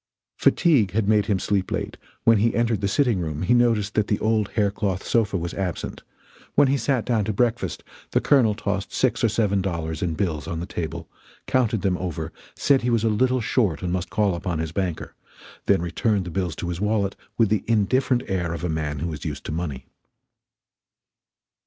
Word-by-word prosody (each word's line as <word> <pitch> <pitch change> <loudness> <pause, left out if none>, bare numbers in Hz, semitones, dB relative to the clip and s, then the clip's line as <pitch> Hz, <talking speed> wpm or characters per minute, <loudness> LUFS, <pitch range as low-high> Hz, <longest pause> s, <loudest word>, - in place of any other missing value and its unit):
Fatigue 125 - +3
had 105 -1 +1
made 105 -1 +3
him 100 - +2
sleep 95 0 0
late; - - -3 0.3
when 115 -2 +5
he 115 +3 +2
entered 115 -3 +1
the 100 - +1
sitting 120 -1 +2
room 80 -1 -3
he 105 - +3
noticed 115 -4 +2
that 105 -1 +1
the 105 - +1
old 110 -2 +1
hair 105 -3 +2
cloth 100 -2 -2
sofa 105 -4 +1
was 85 -1 -4
absent; 95 -3 -4 0.5
when 145 0 +6
he 140 - +3
sat 130 -2 0
down 115 -4 +1
to 110 - -1
breakfast 120 +2 -1 0.3
the - - +2
Colonel 120 -7 +3
tossed 100 -1 -3
six - - 0
or 115 - +4
seven 100 -3 +1
dollars 80 -4 -3
in 85 -3 -1
bills 80 -7 -2
on 85 - -3
the 85 - -4
table, 85 -3 -5 0.4
counted 115 -6 +1
them 95 -3 +1
over, 80 -3 -4 0.2
said 140 -2 +3
he 120 - 0
was 115 -2 +2
a 115 - +3
little 125 +4 +2
short 105 - 0
and 90 -1 -1
must 90 0 -2
call 105 -3 +1
upon 85 -1 -3
his 80 0 -3
banker; 90 -2 -3 0.5
then 95 -4 +3
returned 95 +3 0
the 90 - -6
bills 90 -2 -2
to 85 - -4
his 90 +1 -4
wallet 105 -2 0 0.2
with 115 -3 +4
the 105 -3 +1
indifferent 120 +3 +2
air 90 -3 -1
of 85 - -7
a 90 - -1
man 80 -2 -2
who 80 +3 -3
is 75 - -7
used 75 -3 -4
to - - -4
money. 75 -6 -4
100 Hz, 205 wpm, -24 LUFS, 85-115 Hz, 0.5 s, when